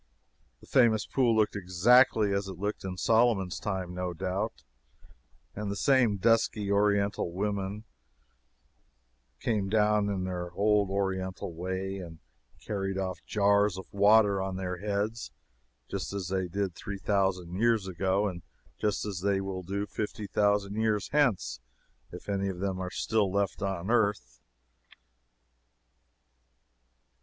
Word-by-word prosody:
The -, -, -15 dB
famous 115 Hz, -5 st, +3 dB
pool 120 Hz, -4 st, +2 dB
looked 110 Hz, -1 st, +2 dB
exactly 100 Hz, +3 st, +4 dB
as 100 Hz, 0 st, -1 dB
it 95 Hz, -3 st, -7 dB
looked 105 Hz, +3 st, -3 dB
in 95 Hz, -1 st, -5 dB
Solomon's 110 Hz, -4 st, +2 dB
time, 95 Hz, -4 st, -3 dB
no 90 Hz, -1 st, -3 dB
doubt, 95 Hz, 0 st, -3 dB, 0.9 s
and 105 Hz, 0 st, -4 dB
the 100 Hz, -, -2 dB
same 120 Hz, -1 st, +3 dB
dusky, 110 Hz, -1 st, +2 dB
Oriental 100 Hz, -2 st, +1 dB
women, 100 Hz, +2 st, -3 dB, 1.6 s
came 105 Hz, -4 st, -1 dB
down 105 Hz, -1 st, +2 dB
in 95 Hz, -2 st, -2 dB
their 90 Hz, -1 st, -4 dB
old 105 Hz, +1 st, +2 dB
Oriental 95 Hz, -2 st, -2 dB
way, 95 Hz, +3 st, -4 dB
and 85 Hz, -3 st, -9 dB, 0.5 s
carried 95 Hz, -2 st, -2 dB
off 95 Hz, -1 st, -3 dB
jars 100 Hz, -2 st, +3 dB
of 95 Hz, -, -9 dB
the -, -, -12 dB
water 100 Hz, -1 st, +5 dB
on 95 Hz, 0 st, -3 dB
their 90 Hz, -1 st, -3 dB
heads, 105 Hz, +4 st, -2 dB, 0.6 s
just -, -, -4 dB
as 95 Hz, -3 st, -4 dB
they 95 Hz, -1 st, -1 dB
did 95 Hz, +1 st, -2 dB
three 100 Hz, +3 st, -6 dB
thousand 95 Hz, -3 st, 0 dB
years 110 Hz, 0 st, +2 dB
ago, 95 Hz, +3 st, 0 dB
and 90 Hz, -3 st, -5 dB, 0.4 s
just 105 Hz, -1 st, 0 dB
as 100 Hz, -4 st, -4 dB
they 100 Hz, +1 st, +1 dB
will 95 Hz, -1 st, -4 dB
do 100 Hz, +3 st, -3 dB
fifty 105 Hz, 0 st, -5 dB
thousand 100 Hz, 0 st, +1 dB
years 110 Hz, -2 st, 0 dB
hence 105 Hz, -, +1 dB, 0.5 s
if -, -, -10 dB
any 100 Hz, -1 st, -1 dB
of 95 Hz, -, -5 dB
them 95 Hz, 0 st, -2 dB
are 90 Hz, -1 st, -3 dB
still 105 Hz, 0 st, 0 dB
left 100 Hz, 0 st, -1 dB
on 95 Hz, 0 st, -2 dB
earth. 100 Hz, -, 0 dB
100 Hz, 140 wpm, -29 LUFS, 95-105 Hz, 1.6 s, water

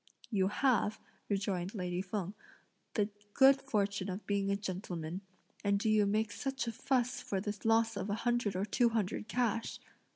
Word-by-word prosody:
"You 190 Hz, -3 st, +3 dB
have," 225 Hz, -1 st, +2 dB, 0.3 s
rejoined 195 Hz, -1 st, -1 dB
lady 180 Hz, -2 st, -1 dB
Feng, 190 Hz, 0 st, -3 dB, 0.6 s
"the 210 Hz, -2 st, +2 dB, 0.3 s
good 270 Hz, 0 st, +7 dB
fortune 205 Hz, -6 st, 0 dB
of 190 Hz, +3 st, -5 dB
being 200 Hz, -1 st, 0 dB
a 200 Hz, -, +2 dB
gentleman, 185 Hz, -3 st, -4 dB, 0.4 s
and 200 Hz, -1 st, +3 dB
do 220 Hz, +1 st, +2 dB
you 210 Hz, -1 st, +4 dB
make 215 Hz, +1 st, +1 dB
such 270 Hz, +4 st, -2 dB
a 230 Hz, -, -2 dB
fuss 255 Hz, +2 st, 0 dB
for 195 Hz, -, -2 dB
the 205 Hz, +2 st, -3 dB
loss 225 Hz, 0 st, +3 dB
of 200 Hz, 0 st, -3 dB
a 205 Hz, -, +1 dB
hundred 240 Hz, -5 st, +1 dB
or 190 Hz, +2 st, 0 dB
two 235 Hz, +3 st, +3 dB
hundred 215 Hz, -2 st, -1 dB
cash!" 230 Hz, -2 st, 0 dB
205 Hz, 170 wpm, -34 LUFS, 195-230 Hz, 0.6 s, good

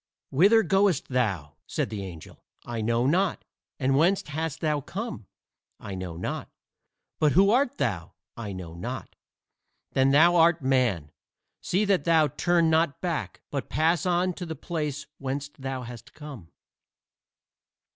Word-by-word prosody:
"Whither 200 Hz, +11 st, +5 dB
goest 195 Hz, -6 st, +2 dB
thou?" 100 Hz, -, -1 dB
said -, -, -2 dB
the 105 Hz, -2 st, -4 dB
angel. 85 Hz, -4 st, -10 dB, 0.2 s
"I 115 Hz, -2 st, -4 dB
know 115 Hz, +2 st, +1 dB
not." 180 Hz, +7 st, +1 dB, 0.3 s
"And 135 Hz, 0 st, +2 dB
whence 185 Hz, +7 st, +3 dB
hast 160 Hz, +1 st, -3 dB
thou 150 Hz, -2 st, 0 dB
come?" 200 Hz, -, -6 dB, 0.5 s
"I 100 Hz, -, -7 dB
know 90 Hz, -3 st, -5 dB
not." 90 Hz, -, -4 dB, 0.7 s
"But 150 Hz, -2 st, +3 dB
who 195 Hz, +3 st, +5 dB
art 250 Hz, +2 st, +2 dB
thou?" 100 Hz, -, -2 dB, 0.2 s
"I 110 Hz, -3 st, -6 dB
know 90 Hz, -3 st, -7 dB
not." 120 Hz, +10 st, -6 dB, 0.8 s
"Then 135 Hz, 0 st, +3 dB
thou 165 Hz, +5 st, +6 dB
art 165 Hz, -2 st, +4 dB
Man. 120 Hz, -, +1 dB, 0.5 s
See 195 Hz, +4 st, +1 dB
that 195 Hz, -2 st, +2 dB
thou 160 Hz, -3 st, +4 dB
turn 170 Hz, +4 st, +2 dB
not 160 Hz, -2 st, +2 dB
back, 170 Hz, -4 st, -3 dB
but 140 Hz, -2 st, -3 dB
pass 165 Hz, +2 st, +2 dB
on 180 Hz, +1 st, +2 dB
to 175 Hz, -, -6 dB
the 160 Hz, -, -4 dB
place 150 Hz, -2 st, -4 dB
whence 140 Hz, +1 st, -3 dB
thou 135 Hz, -2 st, -5 dB
hast 120 Hz, -1 st, -10 dB
come." 140 Hz, -, -10 dB
145 Hz, 145 wpm, -27 LUFS, 120-170 Hz, 0.8 s, thou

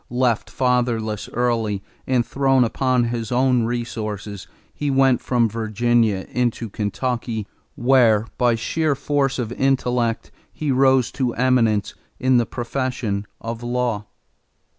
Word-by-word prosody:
Left 120 Hz, -2 st, 0 dB
fatherless 120 Hz, -4 st, 0 dB
early 115 Hz, -5 st, 0 dB, 0.2 s
and 125 Hz, -2 st, +2 dB
thrown 135 Hz, +1 st, +2 dB
upon 125 Hz, +1 st, +1 dB
his 115 Hz, -2 st, -3 dB
own 125 Hz, -1 st, +2 dB
resources, 110 Hz, -4 st, -4 dB, 0.3 s
he 145 Hz, -, -2 dB
went 135 Hz, -2 st, +3 dB
from 120 Hz, -2 st, +2 dB
Virginia 110 Hz, -2 st, +1 dB
into 120 Hz, -3 st, -1 dB
Kentucky 115 Hz, +1 st, -2 dB, 0.3 s
where 120 Hz, -4 st, +4 dB
by 120 Hz, -2 st, +3 dB
sheer 155 Hz, +6 st, 0 dB
force 140 Hz, -1 st, 0 dB
of 120 Hz, -3 st, -3 dB
intellect 125 Hz, -3 st, 0 dB, 0.2 s
he 150 Hz, -3 st, -2 dB
rose 130 Hz, -1 st, +3 dB
to 125 Hz, -4 st, -2 dB
eminence 115 Hz, -5 st, +2 dB, 0.3 s
in 130 Hz, -1 st, +3 dB
the 120 Hz, -, +1 dB
profession 120 Hz, -5 st, -3 dB
of 115 Hz, 0 st, -5 dB
law. 120 Hz, -4 st, -2 dB
120 Hz, 120 wpm, -22 LUFS, 115-130 Hz, 0.3 s, where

